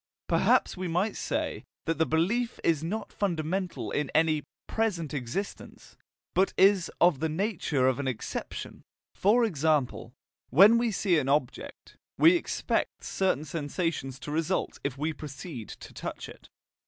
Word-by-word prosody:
Perhaps - - +3
we 185 -1 -4
might 180 +6 0
say - - -2 0.2
that 165 -1 -1
the 160 - +3
belief 215 +10 0
is 160 -2 +2
not 210 +7 -4
fundamentally 180 -2 -2
in 145 -2 -2
any 155 -1 +3 0.2
PRESENT 180 -10 -1
existence, 145 - -5 0.4
but 190 +1 +2
is 195 -2 +5
of 170 -6 +4
the 160 +1 0
nature 160 - 0
of 130 0 +1
an 140 - -2
expectation: 125 -4 -5 0.3
for 230 +5 +3
example, 150 - 0 0.4
when 200 - +7
we 235 0 +1
see 185 -5 +2
an 135 -2 -2
object, 140 -3 -2 0.2
we 335 +2 +7
expect 345 - -1
certain 185 -6 0
sensations 150 -3 -3
to 145 - -7
result 165 +4 -1
if 140 -1 -3
we 155 +3 -1
proceed 140 - -8
to - - -10
touch - - -6
it. - - -14
165 Hz, 145 wpm, -28 LUFS, 145-195 Hz, 0.4 s, when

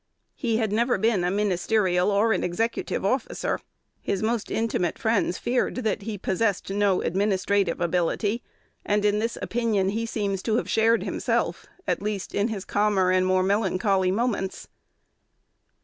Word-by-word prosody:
He 230 -5 -1
had 220 -3 0
never 235 +2 +2
been 215 -2 +2
a 180 - +1
ministerial 190 -1 +1
or 210 +2 +3
an 190 - -1
executive 225 +3 -1
officer. 250 +4 -1 0.4
His 200 +1 -2
most 225 -1 -1
intimate 220 -6 -1
friends 220 -5 +1
feared 245 +1 0
that 220 -6 -1
he 210 +1 -5
possessed 195 +1 -1
no 200 -2 +2
administrative 195 -1 +1
ability; 180 +6 0 0.4
and 205 0 +1
in 210 0 +3
this 230 +2 -2
opinion 220 -5 0
he 225 +3 -2
seems 200 -4 -2
to 220 +1 0
have - - 0
shared 225 +1 +3
himself, - - -1 0.2
at - - -1
least 205 -2 -3
in 205 +2 +1
his 210 -4 -5
calmer 205 -3 +2
and 185 0 +3
more 185 0 +3
melancholy 190 -1 +1
moments. 200 -2 -1
205 Hz, 150 wpm, -25 LUFS, 190-225 Hz, 0.4 s, or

